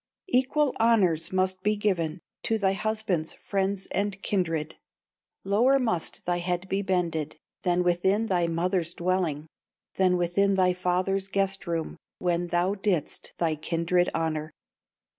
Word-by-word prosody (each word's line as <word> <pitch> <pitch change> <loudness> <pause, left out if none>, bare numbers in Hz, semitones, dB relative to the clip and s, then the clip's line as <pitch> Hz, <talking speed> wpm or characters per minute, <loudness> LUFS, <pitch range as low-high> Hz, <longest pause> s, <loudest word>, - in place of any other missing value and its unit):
"Equal 270 +1 +2
honors 200 -9 +3
must 185 0 +1
be 210 +2 +1
given 175 -5 -1 0.2
To 225 - +2
thy 195 -2 +2
husband's 200 -6 -1
friends 195 -1 -1
and 200 0 -1
kindred; 165 -5 -1 0.7
Lower 230 +8 +4
must 220 -10 -1
thy 175 0 0
head 180 +1 -2
be 195 +1 0
bended, 170 -5 -1 0.3
Than 180 -1 +2
within 190 +5 +2
thy 180 -5 +1
mother's 170 0 -1
dwelling, 170 -4 -1 0.5
Than 185 -1 +3
within 195 +3 +2
thy 185 -1 +3
father's 185 +2 0
guest 195 0 -1
room, 165 -2 -3 0.2
When 175 -1 0
thou 175 +3 +1
didst 195 -6 -1
thy 165 -2 +1
kindred 170 +3 +1
honor. 155 -1 -1
185 Hz, 135 wpm, -27 LUFS, 170-195 Hz, 0.7 s, Lower